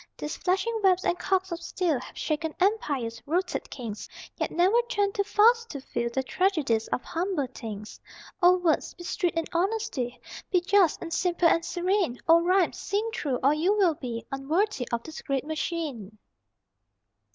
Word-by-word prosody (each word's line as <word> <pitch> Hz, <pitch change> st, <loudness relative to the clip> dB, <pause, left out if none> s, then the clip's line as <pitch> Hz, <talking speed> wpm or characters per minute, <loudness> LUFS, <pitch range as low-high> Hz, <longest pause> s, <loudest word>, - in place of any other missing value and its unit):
These 300 Hz, -, -5 dB
flashing 390 Hz, +5 st, 0 dB
webs 370 Hz, -1 st, +4 dB
and 350 Hz, -, +1 dB
cogs 380 Hz, -1 st, 0 dB
of 340 Hz, 0 st, -4 dB
steel 340 Hz, -4 st, 0 dB
Have -, -, -11 dB
shaken 315 Hz, 0 st, -2 dB
empires, 285 Hz, -, 0 dB
routed 355 Hz, +4 st, -1 dB
kings, 225 Hz, -5 st, -7 dB, 0.3 s
Yet -, -, -2 dB
never 380 Hz, +8 st, +3 dB
turn 405 Hz, -4 st, +1 dB
too 400 Hz, -, 0 dB
fast 460 Hz, +3 st, +4 dB
to 280 Hz, -, -5 dB
feel 235 Hz, -2 st, -3 dB
The 265 Hz, +3 st, -1 dB
tragedies 285 Hz, -, +1 dB
of 250 Hz, -, -2 dB
humble 340 Hz, -4 st, -1 dB
things. 215 Hz, -2 st, -7 dB, 0.4 s
O 360 Hz, +1 st, +6 dB
words, 350 Hz, -3 st, 0 dB
be 350 Hz, -, -10 dB
strict 350 Hz, -1 st, -1 dB
in 330 Hz, -, +1 dB
honesty, 340 Hz, -, -1 dB, 0.3 s
Be 365 Hz, -, +3 dB
just 365 Hz, -2 st, +3 dB
and 335 Hz, -1 st, -5 dB
simple 350 Hz, -1 st, +2 dB
and 335 Hz, 0 st, +3 dB
serene; 360 Hz, -6 st, 0 dB
O 330 Hz, +1 st, +7 dB
rhymes, 365 Hz, +1 st, +2 dB
sing 415 Hz, +3 st, -1 dB
true, 275 Hz, -10 st, -1 dB
or 280 Hz, +2 st, +5 dB
you 355 Hz, +7 st, +2 dB
will 370 Hz, -5 st, +4 dB
be 235 Hz, -6 st, -6 dB
Unworthy 275 Hz, -, 0 dB
of 235 Hz, 0 st, -1 dB
this 315 Hz, -, -8 dB
great 275 Hz, -1 st, -2 dB
machine! 300 Hz, -, -4 dB
335 Hz, 170 wpm, -27 LUFS, 270-380 Hz, 0.4 s, O